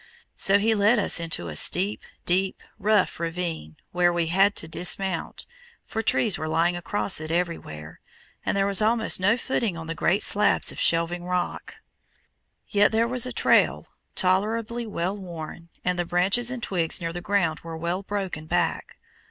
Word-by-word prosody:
So 195 +1 +4
he 220 +2 +2
led 210 +3 +3
us 200 - +2
into 165 - -2
a 80 - -6
steep, 195 - +3 0.2
deep, 185 +2 +1 0.2
rough 210 -3 +1
ravine, 165 - -4 0.2
where 175 0 +2
we 175 -1 0
had 195 +2 +4
to 160 - -4
dismount, 180 +1 -1 0.4
for 225 - -3
trees 215 -2 +1
were 155 - -3
lying 170 +2 +1
across 185 0 0
it 155 - -6
everywhere, 165 - -4 0.4
and - - -1
there 195 - +2
was 200 +1 +5
almost 225 0 +3
no 200 +5 +2
footing 230 -8 -2
on 165 - -7
the 165 - -4
great 175 +4 +1
slabs 210 - +2
of - - -8
shelving 170 +1 +1
rock. 180 0 -3 0.9
Yet 205 0 +3
there 225 +1 +2
was 250 0 +2
a - - -5
trail, - - +2 0.3
tolerably 220 +5 0
well 185 -1 -3
worn, 170 -3 -9 0.2
and 180 0 0
the - - +1
branches 195 +8 +2
and 250 -2 -4
twigs 170 -4 +1
near 165 -1 -4
the 175 - -5
ground 175 -5 0
were 165 -1 -8
well 170 +3 -2
broken 195 -6 -5
back. - - -2
180 Hz, 170 wpm, -25 LUFS, 170-205 Hz, 0.9 s, was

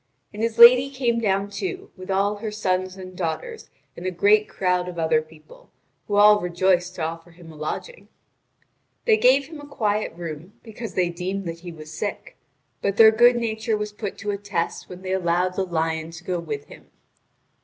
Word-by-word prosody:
And 210 - -6
his 230 -1 -1
lady 250 +3 +9
came 250 -4 0
down, 200 -2 0
too, 380 - -5
with 185 0 -11
all 200 +2 +1
her 215 +1 -4
sons 185 -3 -2
and 185 -1 -10
daughters 190 - -4 0.3
and 170 - -9
a - - +2
great 205 +4 +3
crowd 180 -1 0
of 175 - -9
other 160 -1 +2
people, 155 -1 -18 0.4
who 205 - -1
all 210 0 +7
rejoiced 180 +1 +1
to 165 - -4
offer 165 +1 -5
him 165 -1 -14
a - - -14
lodging. 155 - -6 1.0
They 445 - +5
gave 270 -1 +4
him 315 +1 -10
a 290 - -11
quiet 215 -6 -1
room, 170 +2 -7
because 225 0 -8
they 180 -2 +2
deemed 185 +3 -4
that 165 0 -5
he 175 0 -8
was 155 -1 -11
sick; 205 +4 -5 0.5
but 200 +1 -1
their 220 -1 +9
good 240 +2 +5
nature 220 -1 -1
was 210 0 -4
put 210 -2 -6
to 210 -1 -3
a 200 - -3
test 195 -4 -3
when 180 +1 -10
they 185 0 -2
allowed 180 0 +1
the 195 - -1
lion 160 -2 -2
to 165 +1 -11
go 180 -1 -2
with 145 -4 -5
him. - - -15
190 Hz, 195 wpm, -23 LUFS, 170-220 Hz, 1.0 s, lady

